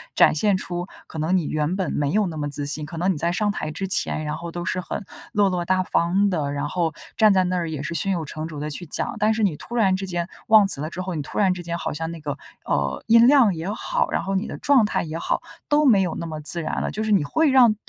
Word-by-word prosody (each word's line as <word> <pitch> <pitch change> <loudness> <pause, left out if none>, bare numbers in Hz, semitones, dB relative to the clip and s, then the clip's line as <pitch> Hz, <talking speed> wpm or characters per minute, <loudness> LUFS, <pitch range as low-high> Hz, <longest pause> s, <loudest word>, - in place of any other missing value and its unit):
展 - - +5
现 200 +5 +2
出 175 -1 -4 0.2
可 - - -9
能 160 +4 +1
你 170 - -1
原 155 +4 -1
本 190 -5 -2
没 145 -1 0
有 210 +1 +2
那 165 - -6
么 145 -1 -3
自 145 0 -4
信， 150 +1 -2
可 165 +2 -8
能 185 +3 +1
你 - - -6
在 170 +3 0
上 205 +4 0
台 155 -6 -4
之 190 +5 -4
前， 155 -4 +1
然 150 - -2
后 170 0 -7
都 175 +1 -5
是 185 0 -1
很 195 - -5 0.3
落 205 -3 +3
落 180 -2 -1
大 185 +2 +1
方 185 +2 +1
的， 150 -6 -1
然 145 0 -2
后 165 0 -1 0.2
站 215 -2 +5
在 185 -1 +3
那 180 +1 -1
儿 170 -2 -1
也 150 -3 -4
是 155 - -4
胸 180 +5 +2
有 170 -4 -1
成 155 +2 -6
竹 155 -3 -7
地 150 +1 -3
去 165 +4 -4
讲， 165 - -3
但 215 +1 +2
是 220 0 -1
你 190 -7 +2
突 235 - -8
然 195 -5 +3
之 190 +1 -4
间 175 -2 -3 0.2
忘 215 -2 +6
词 140 - -1
了 155 - -3
之 170 - -8
后， 185 -1 -4
你 150 - -2
突 - - -8
然 195 -3 +4
之 180 -1 -7
间 170 0 -3
好 - - -3
像 165 +2 -4
那 170 - -8
个， 145 -2 -4 0.3
呃， 70 -2 -1
音 230 +1 +7
量 255 -9 +5
也 165 +4 -4
好， 485 - -1
然 - - 0
后 195 0 -2
你 195 +4 -1
的 - - -6
状 270 -6 +4
态 210 - -1
也 160 -1 -5
好， - - -1 0.3
都 300 0 +4
没 220 -8 +6
有 180 -3 -1
那 170 - -5
么 155 -2 -5
自 170 +3 0
然 155 - -2
了。 - - -1
就 215 - -3
是 220 - -1
你 195 -7 +4
会 315 - +2
让 250 -5 +6
175 Hz, 315 characters per minute, -23 LUFS, 155-200 Hz, 0.3 s, 音